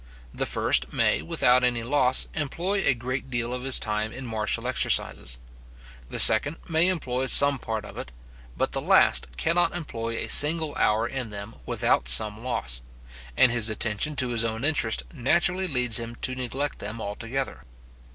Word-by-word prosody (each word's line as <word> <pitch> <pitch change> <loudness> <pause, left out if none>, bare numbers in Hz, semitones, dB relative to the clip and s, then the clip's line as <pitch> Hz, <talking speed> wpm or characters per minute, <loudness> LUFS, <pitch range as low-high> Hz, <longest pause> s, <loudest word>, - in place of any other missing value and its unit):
The - - -2
first - - +1
may, - - 0
without 125 +10 +1
any 120 -2 -1
loss, 130 0 +2
employ 170 +7 -3
a 135 - +3
great 130 +3 -6
deal 120 -1 -3
of 125 - -5
his 135 0 0
time 105 0 -3
in 135 +2 -9
martial 110 -2 -2
exercises; - - -1 0.7
the - - -6
second 145 +8 +7
may 165 0 +2
employ 130 -8 -2
some 140 0 +6
part 110 -2 -5
of - - -10
it; 65 - -8 0.5
but - - -1
the - - -3
last - - +3
cannot 175 - 0
employ 115 -9 -5
a - - -4
single 155 0 +3
hour 110 +2 0
in 125 -2 -5
them 100 +1 -9
without 65 - 0
some 105 - +5
loss, 60 - -2 0.6
and 130 - +4
his 120 -2 +4
attention 110 +7 -1
to 130 -3 +1
his 115 -2 -1
own 115 +2 -3
interest 145 -7 0
naturally 175 +7 0
leads 125 -7 0
him 115 0 -7
to 130 - -2
neglect 130 +3 -5
them 110 +3 -7
altogether. 115 - -6
125 Hz, 170 wpm, -24 LUFS, 110-140 Hz, 0.7 s, second